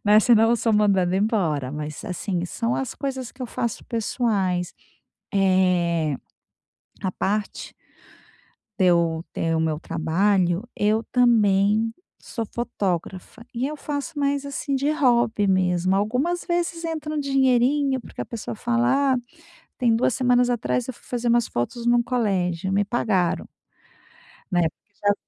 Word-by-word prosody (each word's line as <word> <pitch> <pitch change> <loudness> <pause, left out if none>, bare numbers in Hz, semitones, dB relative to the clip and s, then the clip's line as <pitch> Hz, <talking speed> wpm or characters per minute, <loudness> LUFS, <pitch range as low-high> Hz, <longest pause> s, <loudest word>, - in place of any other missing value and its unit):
né? 210 +1 +6
Se 235 +2 +5
não 225 +1 +4
eu 235 - +3
sou 225 -1 0
mandada 195 -3 +3
embora, 175 - 0
mas 150 +4 -6
assim. 180 -2 -3
São 230 +6 -2
as 265 -3 -3
coisas 265 -3 -4
que 255 - -9
eu - - -3
faço 235 -1 -3
pessoais, 205 -6 -1 0.6
eh 180 -6 +2 0.8
à 185 -2 -2
parte 205 +1 -3 1.1
de 185 - +4
eu 170 -2 +3
ter 165 0 0
o - - +1
meu 160 -1 0
trabalho, 175 +4 +1
eu 215 +2 +1
também 220 -2 +3 0.2
sou 230 - -5
fotógrafa. 200 -2 -4
E 250 +3 -1
eu 305 - -5
faço 295 +1 -5
mais 280 0 0
assim 280 0 -3
de 275 +2 +1
hobby 235 -7 +2
mesmo. 185 0 +2
Algumas 255 - -1
vezes 340 -1 -1
entra 310 -2 -4
um 305 - -1
dinheirinho, 270 0 +2
porque - - -8
a - - -4
pessoa 225 -1 -6
fala 250 +4 +2
"ah". - - 0 0.6
Tem 240 -3 +3
2 235 +1 +2
semanas 250 -1 +3
atrás, 245 +1 -1
eu 260 - -4
fui - - -21
fazer 240 -1 -2
umas 235 -1 +3
fotos 235 - -3
num 240 0 +4
colégio. 190 -7 -1
Me 205 +1 +2
pagaram. 195 -5 0 1.0
Né? 175 -1 +3 0.2
Porque 205 - -38
já 205 0 +3
220 Hz, 150 wpm, -23 LUFS, 185-250 Hz, 1.1 s, né